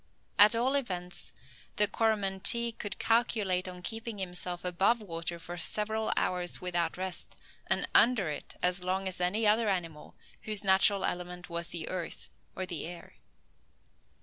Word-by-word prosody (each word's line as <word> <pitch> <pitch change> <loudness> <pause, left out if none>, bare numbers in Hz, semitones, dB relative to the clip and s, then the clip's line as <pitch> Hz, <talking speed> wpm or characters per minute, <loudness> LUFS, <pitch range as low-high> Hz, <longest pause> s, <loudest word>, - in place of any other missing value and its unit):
At 210 +2 +8
all 250 +4 +1
events, 180 -10 -3 0.4
the 210 - +6
Coromantee 220 +2 +3
could 205 -3 -6
calculate 210 -6 +1
on 180 -1 -9
keeping 225 +1 -4
himself 180 -1 -2
above 190 +7 +1
water 170 -4 -5
for 175 +1 -8
several 215 +5 0
hours 180 -1 +1
without 175 -2 -2
rest, 185 -1 -5 0.3
and - - +2
under 230 -7 +5
it 150 - -7
as 180 0 +2
long 190 +1 -2
as 185 -1 -5
any 200 +5 +1
other 215 +1 +3
animal 165 -5 -4 0.3
whose 215 -2 +2
natural 195 0 +5
element 180 0 -5
was 170 0 -4
the 170 -2 -5
earth 180 -3 -5 0.2
or 185 - -3
the 165 -4 -4
air. 175 0 -10
185 Hz, 150 wpm, -29 LUFS, 180-215 Hz, 0.4 s, At